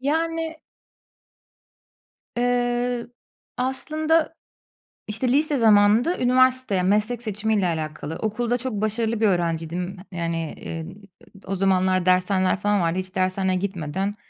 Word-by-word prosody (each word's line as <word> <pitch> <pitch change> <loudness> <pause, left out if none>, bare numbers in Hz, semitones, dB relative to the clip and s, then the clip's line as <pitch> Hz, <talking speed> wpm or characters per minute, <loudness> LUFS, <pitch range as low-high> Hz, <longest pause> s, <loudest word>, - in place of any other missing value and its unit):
Yani 325 +3 -1 1.8
Iıı, 245 0 0 0.4
aslında, 310 +5 0 0.7
işte, 215 +5 -1
lise 295 +1 +2
zamanında 220 - +4
üniversiteye 255 -5 +3
meslek 215 +5 +1
seçimiyle 215 -2 0
alakalı. 155 -1 -4
Okulda 235 +3 -1
çok 255 -1 -4
başarılı 220 +1 -1
bir 220 - +5
öğrenciydim. 175 0 -1
Yani, 165 -2 -3
ııı, 165 +3 -6 0.5
d - - -18
o 195 - -1
zamanlar 185 -1 +2
dershaneler 185 +1 +2
falan 205 -1 +1
vardı. 170 +2 0
Hiç 185 0 -7
dershaneye 185 0 +1
gitmeden 190 +1 -3
205 Hz, 110 wpm, -23 LUFS, 185-245 Hz, 1.8 s, bir